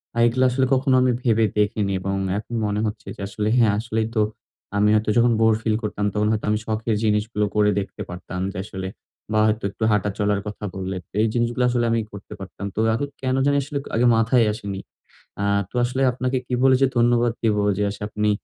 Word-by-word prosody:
আ - - -6
এগুলা 130 +2 +2
আসলে 130 +1 +2
কখনো 130 0 +3
আমি 125 0 +3
ভেবে 115 -2 +3
দেখিনি 105 -1 +1
এবং 95 +1 -2 0.2
এখন 110 +3 -6
মনে 105 0 -1
হচ্ছে 105 0 -5
যে - - -10
আসলে 105 +1 -3
হ্যাঁ। 115 -4 +5
আসলেই 110 -1 -1
তো 110 - +3 0.6
আমি 105 +1 +4
হয়তো 110 0 +1
যখন 120 0 +5
বোর 110 0 +5
ফিল 110 -1 +1
করতাম, 105 -1 -2
তখন 105 0 +1
হয়তো 110 -1 -1
আমি 105 0 +1
শখের 110 0 -1
জিনিসগুলো 105 0 +1
করে 105 0 +4
দেখতে 100 - -6
পারতাম। 90 +1 -6
যে - - -9
আসলে 95 -2 -6 0.4
বা, 110 - +2
হয়তো 110 +1 0
একটু 110 - -6
হাঁটা 105 -1 +1
চলার 105 -1 +1
কথা 105 0 -6
বল্লে। 95 0 -4 0.2
এই 115 - +3
জিনিসগুলা 120 +1 +1
আসলে 120 -1 +1
আমি 115 - +2
করতে 100 -1 -10
পারতাম। 95 +1 -8
তো - - -2
এখন 145 +5 -1
কেন 130 0 0
জানি 145 0 +3
আসলে 140 +2 -5 0.2
আগে 120 +2 +3
মাথায় 115 +1 +3
আসেনি। 100 -3 -5 0.6
আ - - +1 0.3
তো - - -33
আসলে 125 +2 -1
আপনাকে 130 +1 -1
কি 125 - -2
বলে 135 -1 +6
যে 135 - +7
ধন্যবাদ 120 0 +3
দিব 110 -2 +2 0.2
যে, - - +1
আস - - -11
আপনি 105 0 0
110 Hz, 210 wpm, -23 LUFS, 105-120 Hz, 0.6 s, যে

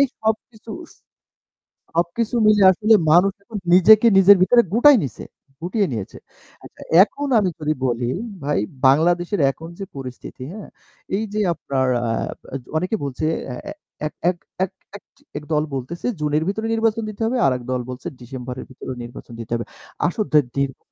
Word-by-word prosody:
এই 280 - +6
সবকিছু 220 +1 -3
উশ - - -15 1.0
সবকিছু 175 +8 -1
মিলে 210 -1 +5
আসলে 215 +4 +3 0.2
মানুষ 180 +4 +5
এখন 215 +1 -7 0.2
নিজেকে 215 +5 +7
নিজের 195 +1 +8
ভিতরে 235 +6 +6
গুটায় 275 +4 +7
নিছে 130 - -6 0.4
গুটিয়ে 190 +4 0
নিয়েছে। 110 -5 -5 0.5
আচ্ছা, - - -14 0.2
এখন 285 +6 -5
আমি 195 -3 +1
যদি 155 0 0
বলি 120 -1 -1 0.3
ভাই 145 +1 0 0.3
বাংলাদেশের 175 +7 +2
এখন 160 +4 -11
যে 195 - -4
পরিস্থিতি, 130 -1 -8
হ্যাঁ? 215 - -9 0.5
এই 210 - -1
যে 215 - -1
আপনার 135 -4 -2 0.2
আ - - +1 0.5
য - - -31
অনেকে 180 +7 -1
বলছে 140 +2 -3 0.2
এ্যা 125 - -5 0.5
এ্য - - -1 0.2
এক 180 - -2 0.3
এক 190 - -2 0.7
এক - - -6
দল 150 0 +2
বলতেছে 135 - -5
জুনের 150 +1 0
ভিতরে 220 +3 -2
নির্বাচন 225 0 +1
দিতে 215 - -9
হবে। 245 +3 0
আরেক 130 -2 0
দল 125 -1 -1
বলছে 125 +7 -7
ডিসেম্বরের 125 0 -7
ভিতরে 130 0 -8
নির্বাচন 120 0 -11
দিতে 115 -1 -8
হবে। 115 - -3 0.4
আসন 210 +5 -2 0.3
দীর্ঘ 140 -1 -1
175 Hz, 160 wpm, -21 LUFS, 135-215 Hz, 1.0 s, নিজের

